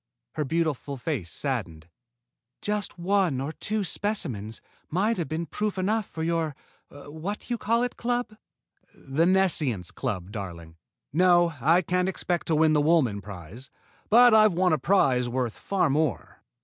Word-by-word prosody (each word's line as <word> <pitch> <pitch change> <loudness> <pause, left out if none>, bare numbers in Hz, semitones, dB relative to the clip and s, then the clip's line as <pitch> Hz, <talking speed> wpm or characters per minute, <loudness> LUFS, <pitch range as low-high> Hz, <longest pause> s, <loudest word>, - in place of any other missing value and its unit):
Her 155 - -1
beautiful 150 -2 -2
face 125 - -3
saddened. 95 - -3 0.7
"Just 205 -3 -3
one 180 -5 +1
or 140 +3 -3
two 210 +5 -3
specimens 145 - -2 0.3
might 200 +6 0
have 170 - -2
been 160 +4 -3
proof 210 +4 -3
enough 210 +3 0
for 160 - -6
your 165 -3 -1 0.3
What 160 - -7
You 240 - -1
Call 230 +3 +1
It 245 - -3
Club!" 240 -2 -2 0.6
"The 150 +5 0
Nescience 155 - +2
Club, 95 -1 -4
darling. 85 -6 -7 0.4
No, 175 0 +4
I 165 +7 +4
can't 180 +2 0
expect 180 -2 -2
to 160 - +2
win 155 0 +4
the 150 - +3
Woolman 145 -10 +2
prize, 100 +5 -10 0.4
but 240 +1 +7
I've 215 -2 +6
won 180 -1 +3
a 155 - +1
prize 130 -7 +2
worth 125 -2 -2
far 195 -2 0
more." 145 -3 -1
160 Hz, 150 wpm, -26 LUFS, 130-190 Hz, 0.7 s, but